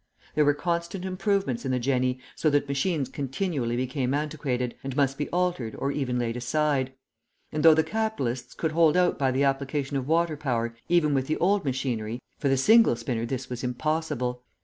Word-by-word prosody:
There 150 0 +3
were 145 0 +4
constant 170 +3 -2
improvements 190 - 0
in 135 - -2
the 130 - +1
jenny, 125 0 +1 0.2
so 155 - +2
that 145 -1 +1
machines 140 +1 0
continually 135 -2 -2
became 130 +1 -1
antiquated, 140 -5 -2
and 135 -1 -4
must 135 -1 +2
be 145 +1 -3
altered 175 -11 -1
or 140 - -1
even 130 -4 -1
laid 120 -1 -1
aside; 130 +1 0 0.6
and 150 - -1
though 160 -1 +8
the 160 - +3
capitalists 135 - -2
could 160 - -1
hold 165 +1 +4
out 180 -3 +2
by 135 -2 +2
the 130 +2 +1
application 140 +1 0
of 130 -1 -3
water 165 0 +2
power 120 -5 -2
even 170 -4 +3
with 135 -1 0
the 155 - 0
old 195 +2 +2
machinery, 125 -4 -2 0.2
for 140 - +1
the 135 - +3
single 220 - +6
spinner 115 0 -3
this 130 +1 -4
was 125 0 -6
impossible. 125 -1 -1
140 Hz, 190 wpm, -27 LUFS, 125-160 Hz, 0.6 s, though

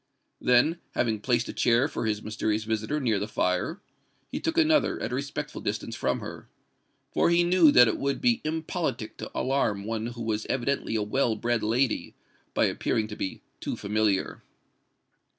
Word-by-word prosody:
Then, 125 +8 +3 0.2
having 110 -3 +1
placed 120 +2 +1
a - - -5
chair 120 +4 +3
for 115 - -3
his 105 -1 -1
mysterious 110 0 -1
visitor 110 +6 -1
near 115 -7 +1
the 105 - -3
fire, 90 - -1 0.5
he - - -2
took 325 0 -2
another 315 -2 +3
at - - -3
a - - -1
respectful - - -4
distance - - -3
from - - -1
her—for - - -5
he 170 0 +4
knew 175 -3 +6
that 125 -3 +7
it 110 - -1
would 140 0 -1
be 240 -1 +2
impolitic 160 +1 -3
to - - -6
alarm 115 -7 0
one 110 +1 -3
who 120 -1 -6
was 110 -1 -2
evidently 130 -2 -1
a 110 - +1
well 115 +2 +1
bred 120 +1 0
lady, 115 +4 0 0.4
by - - +4
appearing 110 -1 0
to 105 - -6
be 95 - -5 0.2
too - - -3
familiar. 105 -1 0
115 Hz, 170 wpm, -27 LUFS, 110-140 Hz, 0.5 s, that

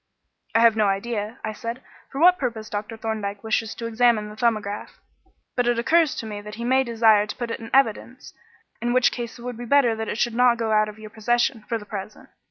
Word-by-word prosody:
"I 230 - +5
have 230 -1 +6
no 215 -2 +2
idea," 210 +3 -2
I 215 - -3
said, 230 +3 -6 0.3
"for 270 - -5
what 360 +3 +6
purpose 230 -4 -4
Dr. 210 +2 -4
Thorndyke 215 -3 -4
wishes 220 0 -1
to 230 - -6
examine 230 -2 +2
the 210 - -10
'Thumbograph,' 215 -3 -2 0.6
but 245 -1 +1
it 240 -1 +2
occurs 315 +5 +3
to - - -5
me 210 -1 -6
that 210 +1 -9
he 235 - -6
may 260 +2 +3
desire 225 -3 +3
to - - -6
put 240 -2 -4
it - - -4
in 225 0 -9
evidence, 255 0 0 0.5
in 240 +1 0
which 255 0 +4
case 240 -1 -6
it 235 - -12
would 245 -2 -5
be 240 - -6
better 245 -2 +3
that 220 0 -4
it - - -3
should 240 0 0
not 245 0 +4
go 225 -1 -1
out 215 0 +3
of 210 - -11
your 215 -1 -11
possession 240 +2 0
for 230 - 0
the 210 - -11
present. 205 0 -8
230 Hz, 235 wpm, -24 LUFS, 215-240 Hz, 0.6 s, have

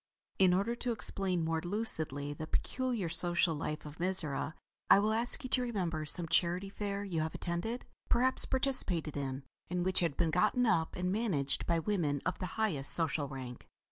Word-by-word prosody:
In 185 -2 +5
order 200 +5 -1
to 245 - -3
explain 190 -6 +1
more 160 0 -1
lucidly 160 -7 0
the 155 +2 -8
peculiar 245 -1 -2
social 175 0 +1
life 150 0 -5
of 150 +2 -11
Mizora, 165 -4 -1 0.3
I - - +8
will 210 +2 +1
ask 240 +6 +3
you 255 - -6
to 255 - +1
remember 175 -10 -3
some 170 +3 +2
Charity 180 +4 0
Fair 200 0 -5
you 175 -6 -3
have 160 0 -4
attended, 200 +8 -4 0.2
perhaps 255 +2 +5
participated 230 - -1
in, 135 -1 -4 0.3
and 180 0 -2
which 185 0 +5
had 165 -5 -1
been 165 -2 0
gotten 245 +8 +1
up 170 -8 0
and 180 0 -2
managed 185 -11 -1
by 170 - +1
women 165 -5 -1
of 180 - -3
the 185 - -4
highest 170 -12 +6
social 160 -3 +3
rank. 130 -3 -9
175 Hz, 180 wpm, -32 LUFS, 155-210 Hz, 0.3 s, I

